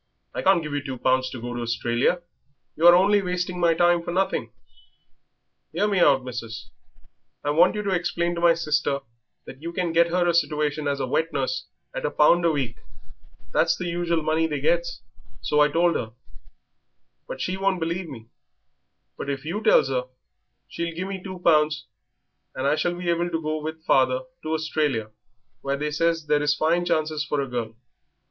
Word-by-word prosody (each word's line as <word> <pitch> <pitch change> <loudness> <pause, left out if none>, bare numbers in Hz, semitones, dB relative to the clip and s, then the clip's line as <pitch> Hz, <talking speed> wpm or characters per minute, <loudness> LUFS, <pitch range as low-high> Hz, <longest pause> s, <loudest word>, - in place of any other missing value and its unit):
I - - -3
can't 190 -3 +3
give 150 -1 -5
you 145 - -1
two 135 -3 -5
pounds 130 +1 +1
to 130 - -7
go 120 +1 -5
to 120 - -4
Australia. 120 +8 0 0.5
You 165 +3 +4
are 175 - +9
only 200 +3 +4
wasting 180 -1 -3
my 170 -1 +3
time 175 0 +3
for 170 - -5
nothing." 190 +2 -1 1.2
"'Ear 210 - +1
me 200 -2 +1
out, 140 -6 +4
missis. 115 -3 -7 0.7
I 145 - 0
want 170 +7 +4
you 210 - -2
to 200 - -1
explain 175 -1 0
to 170 - -4
my 170 -1 +5
sister 150 -3 0 0.4
that 135 - -11
you 170 +1 -5
can 175 -1 -1
get 170 +1 +4
her 175 +1 +1
a 170 - +3
situation 150 -2 0
as 140 -1 -1
a 135 - -1
wet 160 +6 0
nurse - - -2 0.3
at - - -4
a - - +1
pound 170 +3 +4
a - - +5
week 130 -6 -2 0.8
that's - - +3
the 180 - -4
usual 170 -1 -1
money 160 +1 +1
they 150 - -3
gets, - - 0 0.4
so 150 - 0
I 150 - +6
told 170 +2 +2
her, 110 0 -3 1.1
but - - -6
she 185 - -2
won't 195 -1 0
believe 170 +1 -3
me; 115 -5 -11 0.9
but - - -4
if 140 +1 -4
you 185 +7 -3
tells 135 - +4
her, 125 -1 -1 0.6
she'll 170 -1 -4
give 185 +3 -4
me 195 -1 -5
two 185 0 -7
pounds 155 -3 +3 0.7
and 130 - -3
I 145 +2 +3
shall 175 +3 -1
be 175 -1 -1
able 170 +1 0
to 165 -1 -2
go 155 0 -3
with 160 +1 -6
father 130 -1 +3 0.2
to 155 0 -3
Australia, 150 -8 -1 0.5
where 140 0 -2
they 150 +1 -2
says 165 +1 0
there 150 -1 +2
is 145 0 +2
fine 170 +3 +1
chances 155 -2 0
for 150 -1 -2
a 140 - -1
girl." 120 -3 -4
160 Hz, 195 wpm, -24 LUFS, 140-175 Hz, 1.2 s, are